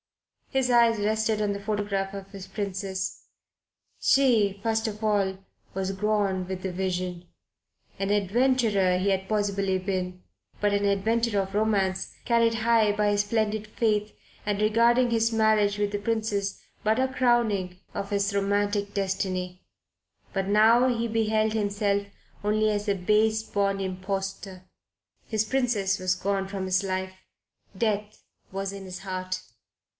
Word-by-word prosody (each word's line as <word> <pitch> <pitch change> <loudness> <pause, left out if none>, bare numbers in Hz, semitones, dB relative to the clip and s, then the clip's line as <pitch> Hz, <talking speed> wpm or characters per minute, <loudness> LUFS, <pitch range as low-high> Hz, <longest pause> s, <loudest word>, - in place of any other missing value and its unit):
His 265 -2 +1
eyes 235 -1 +5
rested 215 +1 +1
on 205 -1 +1
the 200 - -6
photograph 200 -2 -2
of 195 0 -8
his 195 -2 -8
Princess. 190 -1 -4 0.7
She, 220 -8 +3
first 225 0 0
of 215 0 -5
all, 200 -3 +1 0.4
was 190 0 -1
gone 200 -2 0
with 185 0 -5
the 190 -1 -3
Vision. 180 -1 -3 0.7
An 195 0 -1
adventurer 205 -2 +2
he 190 +2 +1
had 190 -1 -1
possibly 200 -2 +1
been; 185 -1 -3 0.4
but 205 -1 +2
an 200 0 +1
adventurer 205 +1 +1
of 195 0 -10
romance, 200 -3 0
carried 230 -1 +3
high 225 -3 +4
by 210 0 +1
his 205 0 +3
splendid 215 0 -1
faith, 210 -1 0 0.3
and 205 -1 -1
regarding 235 +3 +3
his 230 0 +2
marriage 215 -2 +3
with 205 -1 0
the 205 - -2
Princess 205 -2 -1 0.2
but 220 +3 +2
as 260 0 +1
a - - -12
crowning 225 -8 +1 0.2
of 200 - -4
his 200 0 0
romantic 205 +1 0
destiny. 185 -2 -2 0.7
But 195 -1 -1
now 225 +5 +5
he 235 -1 0
beheld 220 -1 +1
himself 205 -1 0 0.4
only 215 +1 +2
as 205 0 -2
a 200 - +2
base 215 +4 +2
born 200 -2 0
impostor. 195 0 -4 0.6
His 220 -1 0
Princess 220 -6 +1
was 185 0 +1
gone 195 +1 -1
from 195 -1 -4
his 185 +1 +1
life. 190 -1 -2 0.6
Death 210 -1 -1 0.3
was 195 0 -3
in 200 -1 -8
his 185 -1 -7
heart. 185 -1 -4
205 Hz, 145 wpm, -26 LUFS, 195-220 Hz, 0.7 s, eyes